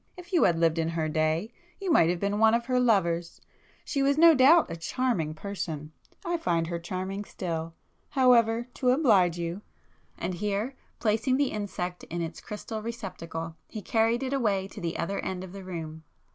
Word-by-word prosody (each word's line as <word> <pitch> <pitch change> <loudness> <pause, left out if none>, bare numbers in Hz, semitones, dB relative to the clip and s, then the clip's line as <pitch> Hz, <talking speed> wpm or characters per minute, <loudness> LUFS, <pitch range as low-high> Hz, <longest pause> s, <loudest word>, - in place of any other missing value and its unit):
If 360 +1 -12
you 345 - +5
had 170 -2 +3
lived 165 0 +2
in 165 0 0
her 165 -1 -1
day, 155 +7 0 0.3
you 390 -3 -1
might 170 - +5
have 175 0 0
been 200 +2 -1
one 220 +1 +5
of 235 0 -1
her 250 0 +1
lovers! 175 -8 +1 0.5
She 280 - -1
was 280 +1 +3
no 335 +1 +8
doubt 285 - +6
a - - -3
charming 165 -3 -1
person,—I 175 - -5
find 170 - 0
her 170 0 -3
charming 190 +3 -4
still! 165 -4 -5 0.3
However, 235 -3 +4
to 250 - 0
oblige 210 - +4
you—" 170 +3 -4 0.6
and 180 +2 -3
here, 210 +7 -2 0.2
placing 225 +4 +1
the 280 -2 +1
insect 180 -4 -4
in 175 - -5
its 165 -1 -5
crystal 215 +1 -6
receptacle 180 -8 -6
he 215 -3 -7
carried 225 +5 +1
it 265 +1 -2
away 205 -8 +1
to - - -10
the 170 -1 -3
other 195 +4 -2
end 185 -1 -4
of 185 -1 -9
the 195 -1 -8
room. 160 -3 -6
195 Hz, 185 wpm, -28 LUFS, 170-240 Hz, 0.6 s, no